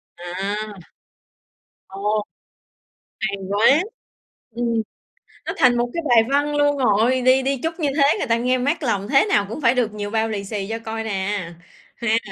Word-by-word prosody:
À. 185 +4 -4 1.3
Ồ. 205 +2 -2 1.0
Hay 200 0 -2
quá! 230 - +4 0.7
Ừm. 235 -1 0 0.6
Nó - - -3
thành 245 -2 +4
một 240 0 0
cái 335 - -3
bài 230 -2 +6
văn 290 +1 +1
luôn 290 0 +2
rồi, 250 +1 +2
đi 255 +1 +4
đi 275 0 0
chúc 325 +2 -3
như 300 - +1
thế 280 0 +4
người - - -2
ta 230 0 +2
nghe 250 +2 +1
mát 285 +5 -1
lòng 205 -5 -1
thế 275 +5 +4
nào 205 - +2
cũng 265 +7 -6
phải 240 0 +3
được 230 -4 0
nhiều 205 -1 -4
bao 225 0 0
lì 205 -2 -3
xì 200 -1 -4
cho 225 - -3
coi 225 0 -5
nè, 220 - -4 0.8
ha. 225 -1 +1
235 Hz, 175 wpm, -21 LUFS, 210-270 Hz, 1.3 s, bài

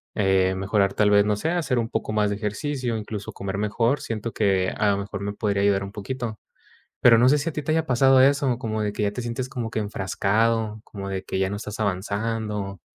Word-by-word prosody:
eh, 95 -2 +2
mejorar 100 +1 +1
tal 105 -1 +3
vez, 100 0 +6
no 105 0 0
sé, 160 +9 -1
hacer 150 -8 0
un 115 - -1
poco - - -2
más 105 -1 +2
de 100 - -1
ejercicio, 115 +4 -2
incluso, 105 -1 -6
comer 100 0 -5
mejor. 115 +6 +1
Siento 115 0 -4
que 95 -3 +2
a 105 -1 0
lo 100 - +1
mejor 100 0 -5
me 100 0 -2
podría 100 -1 -1
ayudar 100 -1 +2
un 100 - -10
poquito, 110 +1 -5 0.6
pero, 115 -2 +6
no 125 +2 +6
sé, 150 - +4
¿si 145 +4 -3
a - - -7
ti 150 - -3
te 155 - -2
haya 160 0 +1
pasado 135 0 +4
eso?, 135 -2 +3
como 110 -3 -3
de 105 -1 -1
que 105 - -3
ya 100 - +1
te 125 - -4
sientes 120 +2 -4
como 120 -4 -4
que 110 - -5
enfrascado, 105 +2 0
como 100 -2 -7
de 95 -1 -3
que - - -4
ya 95 +1 0
no 100 - -3
estás 105 0 -7
avanzando. 100 0 -2
105 Hz, 235 wpm, -24 LUFS, 100-120 Hz, 0.6 s, vez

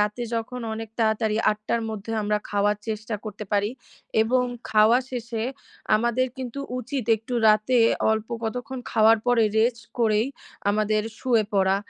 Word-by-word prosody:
রাতে 210 +3 0
যখন 245 +2 -4
অনেক 225 0 -6
তাড়াতাড়ি, 220 -1 +1
০৮ঃ০০ 215 +2 -2
'র - - -4
মধ্যে 220 +1 -5
আমরা 210 0 +1
খাওয়ার 205 0 +2
চেষ্টা 220 0 -3
করতে 210 0 -6
পারি 205 +1 +2 0.5
এবং 250 +3 +2 0.3
খাওয়া 220 +3 +5
শেষে 235 -2 -4 0.5
আমাদের 240 +3 +1
কিন্তু 260 +1 -5 0.2
উচিত 255 +1 -3
একটু 225 +3 -6
রাতে 215 +4 +4 0.3
অল্প 220 0 -2 0.2
কতক্ষণ 250 +3 -4
খাওয়ার 225 0 +5
পরে, 240 -2 +4
রেস্ট 235 +1 +1
করেই 220 0 +3 0.4
আমাদের 215 +1 +1 0.2
শুয়ে 235 -5 +2
পরা। 195 0 +3
220 Hz, 145 wpm, -25 LUFS, 215-240 Hz, 0.5 s, খাওয়া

